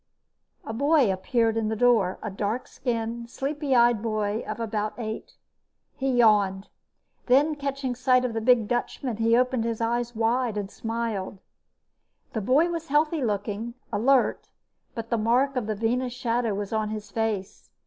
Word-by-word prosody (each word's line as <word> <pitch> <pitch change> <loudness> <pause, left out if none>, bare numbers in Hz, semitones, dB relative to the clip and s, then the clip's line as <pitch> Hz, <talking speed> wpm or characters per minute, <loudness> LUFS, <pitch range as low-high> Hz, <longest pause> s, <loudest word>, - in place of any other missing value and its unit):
_" - - -16
A 220 - -3
boy 280 -3 +3
appeared 225 +4 +1
in 225 -1 0
the 220 - -1
door, 220 -5 +3
a 215 - -3
dark 210 +5 -2
skinned, 235 -2 -3
sleepy 280 +1 -1
eyed 235 -2 +4
boy 215 -1 -1
of - - -4
about 215 -2 -2
eight. 220 -2 -6 0.6
He 270 0 -1
yawned. 205 -5 +3 0.6
Then, 280 +5 +4
catching 275 -3 -3
sight 255 0 +2
of 240 - -2
the 225 - -2
big 235 -2 +4
Dutchman, 245 0 -2
he 230 +1 +3
opened 250 -1 +1
his 230 -1 -2
eyes 240 +1 -1
wide 230 0 +1
and 200 -1 -4
smiled. 225 -4 -3 1.0
The 220 - -2
boy 290 - +3
was 330 -1 -4
healthy 300 +1 +1
looking, 210 +2 -2 0.2
alert, 260 +4 +2 0.5
but 230 -1 -6
the 235 - +2
mark 250 +5 +2
of 245 -4 -1
the 215 - -1
Venus 240 +4 -1
Shadow 235 -3 -1
was 205 +1 -4
on 215 -1 0
his 210 -1 -6
face. 220 -4 -3
230 Hz, 165 wpm, -26 LUFS, 215-255 Hz, 1.0 s, eyed